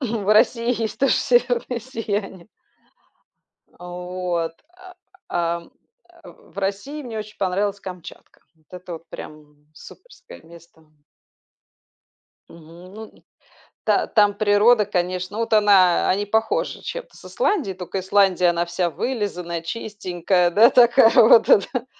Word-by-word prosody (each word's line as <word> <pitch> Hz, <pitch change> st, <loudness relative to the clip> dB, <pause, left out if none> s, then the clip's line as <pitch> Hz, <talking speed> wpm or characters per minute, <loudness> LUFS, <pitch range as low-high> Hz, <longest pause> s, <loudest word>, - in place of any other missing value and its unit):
В 215 Hz, -5 st, -1 dB
России 230 Hz, +1 st, +2 dB
есть 220 Hz, -, -4 dB
тоже 275 Hz, -, +2 dB
северное 245 Hz, 0 st, 0 dB
сияние. 205 Hz, -6 st, -5 dB, 1.3 s
А 175 Hz, -, -12 dB
вот. 180 Hz, -2 st, -4 dB, 0.2 s
А, 370 Hz, 0 st, -15 dB, 0.3 s
ам, 170 Hz, 0 st, -3 dB, 0.5 s
а -, -, -14 dB
в -, -, -17 dB
России 200 Hz, +10 st, -4 dB
мне 230 Hz, -4 st, -7 dB
очень 215 Hz, 0 st, -9 dB
понравилась 200 Hz, +2 st, -1 dB
Камчатка. 180 Hz, -4 st, -11 dB
Вот 160 Hz, -1 st, -35 dB
это 180 Hz, -1 st, -9 dB
вот 165 Hz, 0 st, -13 dB
прям 150 Hz, -1 st, -12 dB
суперское -, -, -15 dB
место. 165 Hz, 0 st, -18 dB, 1.7 s
Мгм, 170 Hz, +3 st, -15 dB
ну, 220 Hz, -, -9 dB
н -, -, -19 dB, 0.6 s
та -, -, +1 dB
там 205 Hz, -3 st, +3 dB
природа, 210 Hz, +1 st, +3 dB
конечно, 185 Hz, 0 st, -3 dB
вот 230 Hz, 0 st, -3 dB
она 200 Hz, -4 st, +4 dB
они 200 Hz, +2 st, 0 dB
похожи 220 Hz, +2 st, -1 dB
чем-то -, -, -8 dB
с -, -, -17 dB
Исландией, 400 Hz, -, -1 dB
тока 185 Hz, +1 st, -5 dB
Исландия- 190 Hz, -1 st, +2 dB
она 170 Hz, 0 st, -1 dB
вся 175 Hz, 0 st, -2 dB
вылизанная, 180 Hz, -6 st, -4 dB
чистенькая, 180 Hz, -2 st, -2 dB
да, 220 Hz, +6 st, +6 dB
такая 240 Hz, -2 st, +5 dB
вот, 225 Hz, 0 st, +6 dB
а, -, -, +8 dB
да? 245 Hz, +5 st, -5 dB
200 Hz, 130 wpm, -21 LUFS, 175-225 Hz, 1.7 s, а